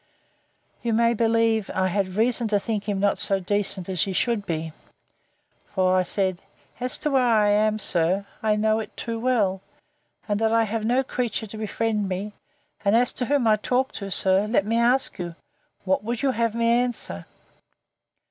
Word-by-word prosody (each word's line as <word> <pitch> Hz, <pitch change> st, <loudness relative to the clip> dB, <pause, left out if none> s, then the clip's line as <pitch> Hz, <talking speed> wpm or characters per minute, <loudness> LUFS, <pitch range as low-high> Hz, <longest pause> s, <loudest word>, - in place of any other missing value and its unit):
You 235 Hz, -1 st, -1 dB
may 235 Hz, +1 st, +3 dB
believe 225 Hz, -2 st, +1 dB
I 190 Hz, -, +1 dB
had 185 Hz, 0 st, -2 dB
reason 230 Hz, +1 st, +1 dB
to 210 Hz, -1 st, +1 dB
think 210 Hz, -1 st, -3 dB
him 200 Hz, -1 st, -1 dB
not 200 Hz, 0 st, +1 dB
so 195 Hz, -, +2 dB
decent 195 Hz, -1 st, -1 dB
as 185 Hz, -4 st, +2 dB
he 195 Hz, -, 0 dB
should 220 Hz, 0 st, 0 dB
be; 160 Hz, -1 st, -3 dB, 1.0 s
for 185 Hz, -1 st, +3 dB
I 185 Hz, -, +4 dB
said, 185 Hz, 0 st, 0 dB, 0.4 s
As 250 Hz, 0 st, 0 dB
to 300 Hz, -, -1 dB
where 265 Hz, -1 st, +3 dB
I 220 Hz, -4 st, +3 dB
am, 215 Hz, +1 st, +2 dB
sir, 185 Hz, 0 st, 0 dB, 0.2 s
I 215 Hz, -1 st, +2 dB
know 215 Hz, +1 st, +1 dB
it 215 Hz, -, -8 dB
too 230 Hz, -1 st, -4 dB
well; 215 Hz, -6 st, +1 dB, 0.7 s
and 205 Hz, -1 st, 0 dB
that 220 Hz, 0 st, +1 dB
I 230 Hz, 0 st, +3 dB
have 220 Hz, 0 st, -3 dB
no 250 Hz, +4 st, +2 dB
creature 245 Hz, -3 st, -2 dB
to 215 Hz, -, -10 dB
befriend 215 Hz, -1 st, -2 dB
me: 195 Hz, +3 st, -4 dB, 0.5 s
and, 200 Hz, +2 st, +3 dB
as 245 Hz, +1 st, +2 dB
to 250 Hz, -, -2 dB
whom 280 Hz, -1 st, +1 dB
I 215 Hz, -1 st, +4 dB
talk 255 Hz, +5 st, 0 dB
to, 200 Hz, -1 st, -6 dB
sir, 190 Hz, +2 st, +3 dB
let 215 Hz, -3 st, +1 dB
me 225 Hz, +2 st, 0 dB
ask 245 Hz, 0 st, +2 dB
you, 170 Hz, -2 st, -5 dB, 0.5 s
What 215 Hz, +6 st, -1 dB
you 275 Hz, -, +3 dB
would 260 Hz, -, -1 dB
have 230 Hz, -1 st, 0 dB
me 230 Hz, 0 st, +1 dB
answer? 235 Hz, -, -1 dB
215 Hz, 185 wpm, -24 LUFS, 195-235 Hz, 1.0 s, I